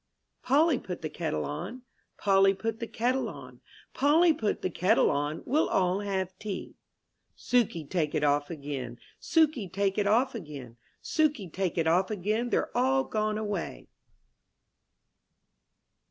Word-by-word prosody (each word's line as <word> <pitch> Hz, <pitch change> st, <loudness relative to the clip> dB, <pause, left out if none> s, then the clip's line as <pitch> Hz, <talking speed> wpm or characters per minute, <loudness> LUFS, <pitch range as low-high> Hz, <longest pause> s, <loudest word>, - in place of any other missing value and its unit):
pOLLY 290 Hz, +1 st, +3 dB
put 180 Hz, -3 st, -7 dB
the 155 Hz, -, -3 dB
kettle 160 Hz, -1 st, -2 dB
on, 155 Hz, +10 st, -5 dB
^ 255 Hz, -, -13 dB, 0.4 s
Polly 195 Hz, -1 st, +4 dB
put 225 Hz, +2 st, -3 dB
the 230 Hz, -, -4 dB
kettle 250 Hz, +4 st, 0 dB
on, -, -, -11 dB, 0.3 s
Polly 320 Hz, +4 st, +4 dB
put 220 Hz, -7 st, -2 dB
the -, -, +1 dB
kettle 180 Hz, +3 st, +3 dB
on, 145 Hz, +3 st, -2 dB
We'll 300 Hz, +6 st, +2 dB
all 185 Hz, +1 st, +2 dB
have 190 Hz, -2 st, -2 dB
tea. 205 Hz, -3 st, -5 dB, 0.6 s
Sukey 225 Hz, -10 st, +1 dB
take 160 Hz, -4 st, -1 dB
it 150 Hz, -, 0 dB
off 145 Hz, 0 st, +2 dB
again, 140 Hz, -6 st, -5 dB, 0.2 s
Sukey 310 Hz, -, +2 dB
take 195 Hz, +1 st, 0 dB
it 205 Hz, -, +1 dB
off 245 Hz, +6 st, +3 dB
again, 145 Hz, -, -8 dB, 0.3 s
Sukey 295 Hz, -, 0 dB
take 185 Hz, -2 st, -2 dB
it 165 Hz, -, +2 dB
off 175 Hz, +4 st, +3 dB
again 215 Hz, +4 st, -1 dB
They* -, -, +2 dB
re -, -, +2 dB
all 265 Hz, +2 st, +2 dB
gone 215 Hz, -2 st, -1 dB
away. 195 Hz, -, -4 dB
195 Hz, 150 wpm, -28 LUFS, 165-240 Hz, 0.6 s, Polly